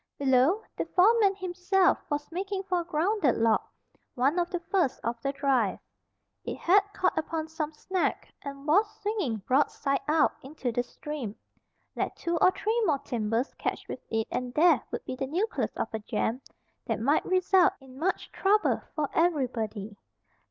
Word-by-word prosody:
Below, 275 - +3
the - - -2
foreman 400 +1 +5
himself 370 0 +2
was 290 +1 -3
making 385 +2 -3
for 365 -2 0
a - - -2
grounded 335 - +1
log, 225 -1 +3 0.5
one 275 +8 +2
of 345 0 0
the 355 - -2
first 345 -5 0
of 235 0 -3
the 275 - -1
drive. 270 -8 +1 0.7
It - - -4
had 375 +4 +5
caught 370 -2 +1
upon 315 0 -2
some 315 -1 -3
snag, 365 +4 -1 0.3
and 275 0 -8
was 400 +8 +4
swinging 370 - -2
broadside 275 +1 +1
out, 310 +1 +4
into 270 -2 -4
the 245 - 0
stream. 245 -3 -6 0.6
Let - - -2
two 340 -1 -2
or 365 - +6
three 440 +5 -1
more 305 -6 +3
timbers 240 -2 -2
catch - - -3
with - - -5
it 225 0 -1
and 250 0 -3
there 315 -5 +5
would - - -5
be 255 - -4
the 265 +1 -3
nucleus 380 - -1
of - - -3
a 220 - -2
jam 225 +3 -2 0.5
that - - -1
might 280 +7 +2
result 370 0 +4
in 265 -1 -14
much 375 +4 -1
trouble 420 +2 +2
for 300 -2 0
everybody. 235 - 0
300 Hz, 165 wpm, -28 LUFS, 255-370 Hz, 0.7 s, or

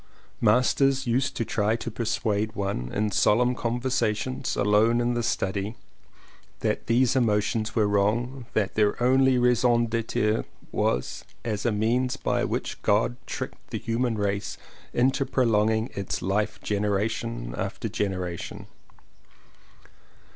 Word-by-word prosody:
Masters 130 +4 +3
used 130 +2 0
to 115 - -1
try 105 +1 +1
to 115 0 -5
persuade 110 -1 -1
one, 95 -12 -3
in 105 0 0
solemn 120 +5 +3
conversations 120 0 -1
alone 110 +3 +3
in 120 0 +1
the 120 - 0
study, 100 -1 -1 0.9
that - - -1
these 125 +2 +3
emotions 110 -2 +1
were 110 -3 +3
wrong, 115 +5 0
that 100 -3 +1
their 105 -1 +2
only 130 +1 +4
raison 120 -1 +3
d'etre 110 -1 0 0.3
was 60 +1 -1 0.2
as 105 -1 -1
a - - +2
means 125 +5 +1
by - - 0
which - - -3
God 110 +3 +2
tricked - - -6
the - - -3
human 115 0 -1
race 100 0 -2 0.3
into 130 +3 +2
prolonging 110 -3 +1
its 100 -1 -3
life 100 +3 0
generation 105 - -1
after - - -3
genera 90 -4 -2
tion. - - -8
110 Hz, 125 wpm, -26 LUFS, 105-120 Hz, 0.9 s, only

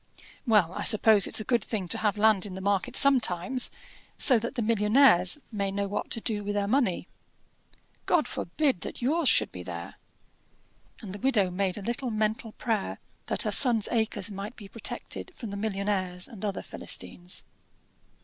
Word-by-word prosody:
"Well, 205 -7 +3
I - - -5
suppose 215 -3 +5
it's - - 0
a - - -2
good 235 -2 0
thing 200 -5 -4
to - - +1
have 210 -1 0
land 210 -2 +3
in 185 - -8
the - - -6
market 200 +5 -1
sometimes, 255 -3 +4 0.5
so 250 -4 +4
that 235 +5 -5
the 240 - -1
millionnaires 210 -2 +4
may 200 -3 -2
know 200 +1 -2
what 205 +1 -4
to - - -2
do 215 -2 -2
with 205 0 -3
their 200 -1 0
money." 220 -7 0 1.0
"God 335 -4 +2
forbid 265 - -1
that - - -7
yours 300 +2 +2
should - - +3
be 90 - -8
there!" 85 -1 -8 1.1
And 195 -3 -7
the 205 - -7
widow 215 -7 +2
made 190 +1 -1
a 205 - -7
little 240 +4 -3
mental 220 +1 -2
prayer 220 -4 -2 0.3
that - - 0
her - - -1
son's 235 -6 +4
acres 220 -3 -1
might 200 +4 -7
be 205 - -11
protected 230 - -5
from 225 -4 -7
the - - -5
millionnaires 195 -3 -2
and 220 -5 -11
other 200 -2 -3
Philistines. 175 +1 -5
210 Hz, 180 wpm, -27 LUFS, 195-235 Hz, 1.1 s, suppose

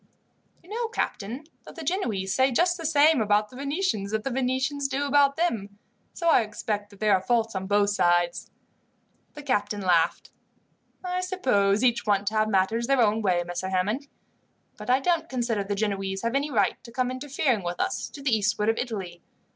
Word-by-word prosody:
"You 350 - -19
know, 465 +1 -2
captain, 250 - -3 0.2
that - - -13
the 330 - -7
Genoese 220 - -1
say 260 +5 +3
just 350 +8 +2
the 330 -3 -3
same 305 0 +5
things 225 - +2
about 210 +1 +1
the - - -13
Venetians, 280 - -2
that 215 0 -2
the 270 - -2
Venetians 265 +2 -1
do 275 +1 -2
about 280 0 +4
them. 210 - -1 0.4
So 340 - -2
I 325 - +6
expect 210 -1 -4
that 200 -2 -17
there 215 -1 +3
are 190 - +3
faults 225 +2 0
on 190 -1 -4
both 205 0 +3
sides." 175 -3 +1 0.9
The 295 - -9
captain 205 -6 -1
laughed. 175 -3 +1 0.7
"I 365 0 -2
suppose 250 - +1
each 240 -3 +2
want 200 -1 +2
to - - -12
have 215 0 +2
matters 215 +4 +1
their 275 -1 +2
own 220 -1 +3
way, 180 -4 +1
Messer 175 +2 -4
Hammond, 210 +10 -1 0.7
but - - -9
I 255 +1 +4
don't 330 +2 0
consider 235 -5 -1
the 200 +1 -3
Genoese 195 -2 -2
have 230 +1 -1
any 280 +2 0
right 205 -8 0
to 235 - -12
come 250 +1 -1
interfering 260 -3 -1
with 175 0 -4
us, - - -2
to 280 - -11
the 265 -5 +3
eastward 210 0 +1
of 225 - +1
Italy. 195 -8 -5
225 Hz, 195 wpm, -26 LUFS, 200-275 Hz, 0.9 s, I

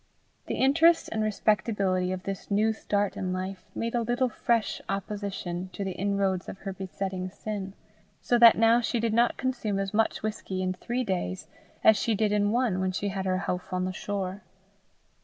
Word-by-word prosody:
The - - -2
interest 325 +5 +4
and 220 - -1
respectability 205 -3 +1
of 185 0 -4
this 195 0 -5
new 215 +2 +2
start 205 -2 -1
in 185 -1 -2
life, 185 +1 -4
made 230 0 -2
a 240 - +1
little 240 +2 +1
fresh 230 -1 0
opposition 195 -3 -4
to 200 - -4
the 190 - -2
inroads 195 -1 -1
of - - -7
her 195 -2 -4
besetting 190 0 -4
sin; 200 0 -5 0.5
so 240 - +2
that 235 -1 +9
now 230 +1 +5
she 235 0 -1
did 225 -1 0
not 235 +1 +3
consume 240 -6 -1
as 195 0 -2
much 220 0 +1
whisky 195 -3 -3
in 185 0 0
three 240 +7 -3
days 180 - -2 0.4
as 220 -1 +7
she 225 +2 +1
did 210 0 +1
in 205 -1 +2
one 235 -5 +1
when 190 0 0
she 200 +2 -2
had 190 -1 -3
her 185 0 0
houff 180 +1 -3
on 185 0 0
the 185 - -3
shore. 195 0 -4
200 Hz, 190 wpm, -28 LUFS, 185-225 Hz, 0.5 s, that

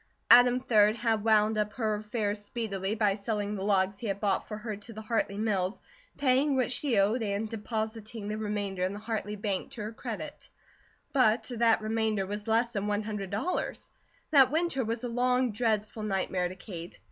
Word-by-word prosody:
Adam, 245 +1 +8
3d, 215 -4 +4
had 225 -2 0
wound 215 -1 +3
up 210 0 -1
her 220 -3 0
affairs 210 -1 -2
speedily 205 -3 -3
by 210 -3 +2
selling 205 0 -2
the 195 -2 -4
logs 195 -1 +2
he 230 - -4
had 200 -1 -2
bought 205 -2 0
for 210 - -5
her 215 0 -5
to 210 +3 -10
the 220 - -7
Hartley 215 -2 -1
mills, 200 -3 0 0.4
paying 275 +1 +3
what 255 -1 +1
she 260 -3 0
owed, 210 +5 +3
and 205 0 -1
depositing 220 0 -4
the 210 - -2
remainder 205 -3 -2
in 185 +2 0
the - - -6
Hartley 210 -1 -3
Bank 200 -2 -2
to 215 - -5
her 215 +2 -5
credit; - - -7 0.6
but 250 -2 +3
that 230 -1 +3
remainder 215 -2 0
was 205 +2 -5
less 230 +2 +2
than 200 0 -2
one 205 0 0
hundred 210 -3 -4
dollars. 220 - -2 0.4
That 270 -4 +7
winter 315 -3 0
was 225 +1 -3
a - - -1
long, 250 +1 +1
dreadful 215 -1 -1
nightmare 190 -3 -1
to 185 - -8
Kate. 175 -4 -8
215 Hz, 190 wpm, -29 LUFS, 205-230 Hz, 0.6 s, Adam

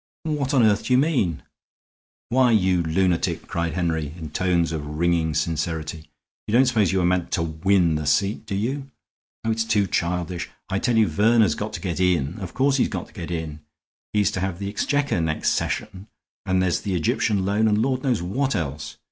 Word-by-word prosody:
"What 150 -4 -1
on 125 - +5
earth 105 -1 +3
do 125 - +1
you - - +6
mean?" 130 - +1 0.9
"Why, 125 +1 +4
you 95 -5 +3
lunatic," 85 +1 0
cried 85 -1 -2
Henry, 80 -4 -2
in 80 -3 -7
tones 85 -1 +1
of 80 -2 -3
ringing 85 -2 +1
sincerity, 80 0 -2 0.4
"you 105 - -3
don't 130 +3 +6
suppose 110 -7 +2
you 95 - 0
were 90 - +2
meant 90 0 +1
to 85 - +1
win 85 +2 +2
the 75 -1 -2
seat, 100 +9 +1
did 100 - -3
you? 135 +7 -2 0.6
Oh, 115 - +2
it's 110 0 0
too 105 -2 +2
childish! 85 -1 -2 0.2
I 95 - +1
tell 120 0 +1
you 110 -2 +5
Verner's 110 0 +3
got 105 +1 -4
to - - -4
get 90 -2 -3
in. 90 -1 +1
Of 95 -3 -7
course 135 +1 +2
he's - - +3
got 95 -4 -5
to - - -22
get 90 -6 -7
in. 80 -3 -4 0.5
He's 105 -1 +2
to - - -3
have 95 -1 -2
the 100 +1 -4
Exchequer 140 0 0
next 80 -1 0
session, 100 -2 -3 0.4
and 95 0 +2
there's 90 -2 0
the 100 -3 -2
Egyptian 95 +4 +1
loan 105 +3 +2
and 105 -1 +2
Lord 130 +2 0
knows 125 -10 0
what 130 +8 -1
else. 75 -4 -4
95 Hz, 200 wpm, -23 LUFS, 85-110 Hz, 0.9 s, you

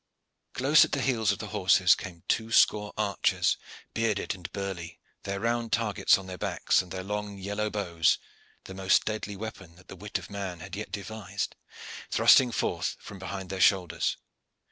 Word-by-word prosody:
Close 140 +5 +6
at - - -2
the 140 - +1
heels 115 -6 +2
of 100 - -2
the - - -7
horses - - +5
came 85 -2 -7
two 115 0 0
score 105 -2 +4
archers 105 -2 +1 0.4
bearded 110 -3 0
and 90 -4 -9
burly, 95 -4 -5 0.3
their 100 0 -2
round 115 +1 -1
targets 110 -3 +3
on 95 - -9
their 95 -1 -8
backs - - +1
and 90 -2 -13
their 95 0 -4
long 105 0 -4
yellow 105 +2 -2
bows, 90 -6 +1 0.5
the 95 - -9
most 95 0 +2
deadly 110 -1 -3
weapon 100 -5 -8
that 95 - -20
the - - -8
wit 105 +3 -4
of - - -9
man 95 -4 -5
had 95 +4 -8
yet 105 -2 -6
devised, 100 -1 -5 0.5
thrusting 125 -2 +6
forth - - -1
from 100 - -10
behind 95 0 -6
their 95 -1 -3
shoulders. 85 -3 +2
100 Hz, 175 wpm, -28 LUFS, 95-110 Hz, 0.5 s, Close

